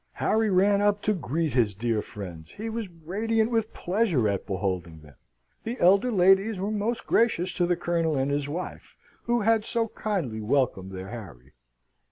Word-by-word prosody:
Harry 220 0 +1
ran 200 +2 +3
up 205 0 +2
to 215 - +2
greet 160 - -2
his 115 -6 +2
dear 115 +1 0
friends: 85 -7 -9
he 225 +2 -5
was 225 -3 -4
radiant 215 +8 -1
with 225 -1 0
pleasure 180 - +1
at 100 -1 -2
beholding 90 -4 -3
them 75 -1 -16 0.5
the 235 +3 -4
elder 195 +7 +4
ladies 195 +1 +4
were 200 +3 -2
most 215 +3 -2
gracious 220 -6 +2
to 175 - +1
the 175 - +2
Colonel 165 -3 0
and 135 +1 0
his 145 0 -1
wife, 175 +5 -6 0.3
who 235 0 +1
had 225 0 +3
so 230 0 -1
kindly 165 - -3
welcomed 105 -5 0
their 95 0 -7
Harry. 75 - -10
175 Hz, 175 wpm, -26 LUFS, -, 0.5 s, elder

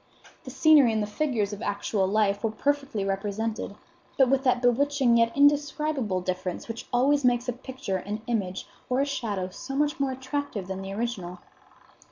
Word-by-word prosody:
The - - -6
scenery 295 -7 +5
and 215 -1 +1
the - - -1
figures 215 -3 -1
of 205 - -7
actual 200 -1 -1
life 205 0 +1
were 225 - +2
perfectly 275 -3 -1
represented, 205 +2 -3 0.4
but 265 -2 +5
with 270 0 +2
that 250 -1 +3
bewitching, 255 0 +3
yet 230 0 +3
indescribable 285 -7 +2
difference 185 0 -4
which 230 0 -7
always 275 +4 +3
makes 245 0 +2
a 250 - 0
picture, 255 -5 -4
an 210 +4 -5
image, 200 -6 -2 0.2
or 255 +1 +1
a - - +2
shadow 210 -9 -3
so 270 +8 -7
much 295 +1 0
more 275 -1 +1
attractive 260 -5 -4
than 190 +1 -5
the 195 0 -6
original. 195 -5 -4
235 Hz, 175 wpm, -27 LUFS, 200-275 Hz, 0.4 s, scenery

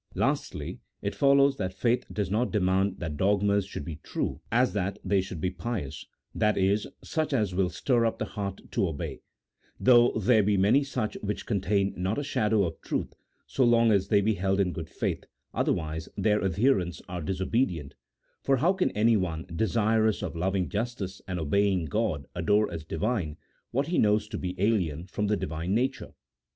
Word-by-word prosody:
Lastly, - - -1 0.2
it - - -1
follows 140 0 +4
that 95 -1 -3
faith 120 +4 +1
does 100 -3 -2
not 115 +4 +1
demand 95 -1 +1
that 80 -4 -4
dogmas 100 +1 +2
should 75 - -6
be 80 -2 -6
true - - -3
as 120 -3 +3
that 100 -1 -1
they 95 0 +3
should 95 -3 -7
be 90 +3 -1
pious 95 - -5
— - - -50
that 105 -1 +1
is, 100 +2 +2 0.2
such 155 -2 -1
as 105 -7 +1
will 90 0 +1
stir 120 +7 +1
up 115 - -2
the - - -2
heart 100 -3 -5
to 100 -5 +1
obey; 80 -4 -5 0.6
though 120 -1 +6
there 110 +1 +4
be 100 0 +2
many 105 +9 +4
such 125 -5 -3
which 105 0 -3
contain 100 -1 +1
not 95 +4 -1
a 145 - -1
shadow 110 -6 +1
of 80 -3 -4
truth, - - -3 0.3
so 135 - 0
long 115 -1 +5
as 100 -2 +2
they 100 -2 +4
be 110 +2 +2
held 95 0 0
in 90 -3 +1
good - - -6
faith, - - -3 0.3
otherwise 80 0 -1
their 105 -2 +2
adherents 95 -2 +1
are 90 -1 -5
disobedient, 90 - -1 0.5
for 135 -1 +2
how 170 +9 +3
can 190 -1 +1
anyone, 100 -7 +1
desirous 110 +1 +2
of - - -4
loving 95 +2 0
justice 105 -3 -4
and 90 -2 -3
obeying 95 +3 +1
God, 95 -7 -1
adore 105 +5 +2
as 85 -2 -5
Divine 90 -3 -2 0.3
what 140 +4 0
he 175 - +1
knows 105 0 +3
to - - -4
be 90 0 -4
alien 90 -7 +1
from 105 +2 -2
the 105 0 +1
Divine 85 +1 -2
nature 130 +3 -1
100 Hz, 185 wpm, -28 LUFS, 90-115 Hz, 0.6 s, though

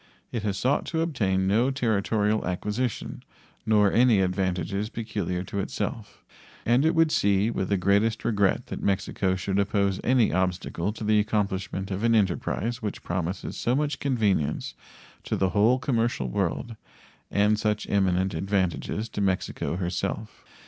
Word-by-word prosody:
It 115 - -2
has 100 -2 -2
sought 130 +7 +1
to 160 -1 -1
obtain 100 - 0
no 110 +7 +3
territorial 110 -4 +1
acquisition, 105 +6 -3 0.5
nor 105 -2 +4
any 120 -3 +5
advantages 95 +2 -1
peculiar 100 -6 -3
to 100 - -4
itself; 95 - -4 0.4
and 120 +4 +3
it 160 +2 +2
would 165 -1 +4
see 100 0 +2
with 95 -4 -2
the 100 - +2
greatest 100 +4 +1
regret 100 -4 +2
that - - -6
Mexico 95 -1 0
should 95 +2 -1
oppose 100 -1 +1
any 125 -6 +3
obstacle 90 0 -1
to 110 - -8
the 105 0 +3
accomplishment 100 -2 -1
of 95 +3 -3
an 115 0 +4
enterprise 110 +4 0
which 105 -2 -4
promises 90 +1 -3
so 120 - 0
much 150 +1 -1
convenience 105 - 0 0.5
to - - -2
the 95 - +1
whole 110 +6 +4
commercial 120 - 0
world 115 - -2 0.5
and 105 +1 +2
such 105 0 -1
eminent 95 -1 +1
advantages 95 +4 -1
to - - -4
Mexico 95 -3 -1
herself. 95 +4 -3
100 Hz, 150 wpm, -26 LUFS, 95-115 Hz, 0.5 s, any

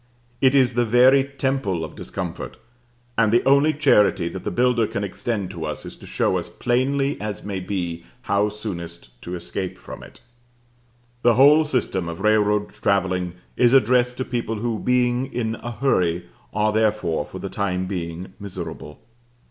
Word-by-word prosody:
It 130 0 +4
is 130 -3 +4
the 120 +1 +2
very 125 +4 +5
temple 135 -10 -2
of - - -11
discomfort, - - -6 0.6
and 110 -2 +4
the 120 - +4
only 140 +3 +5
charity 105 - +3
that 95 0 -7
the - - -2
builder 120 -2 +2
can 100 - -3
extend 100 -1 -3
to 85 -4 -6
us 75 -1 -5
is - - -8
to - - -13
show - - +1
us, - - -7
plainly 135 +3 0
as 105 -3 -5
may 100 -2 -4
be, 90 -3 -4 0.2
how 100 +1 +1
soonest 85 - -7
to 90 - -5
escape 90 +2 -5
from - - -10
it. - - -14 1.0
The 120 -2 +4
whole 145 +5 +6
system 100 - -1
of 85 - -6
railroad 105 0 +2
travelling 95 -2 0 0.2
is 125 0 +4
addressed 125 0 +4
to 130 - -2
people 120 -2 -2
who, 110 0 -2
being 125 +1 +1
in 115 -2 -2
a 120 - -6
hurry, 90 -8 0 0.3
are 105 0 +1
therefore, 105 -8 +1
for - - -10
the - - -5
time 95 -2 -1
being, 90 -1 -5
miserable. 95 -6 -7
105 Hz, 165 wpm, -23 LUFS, 95-125 Hz, 1.0 s, whole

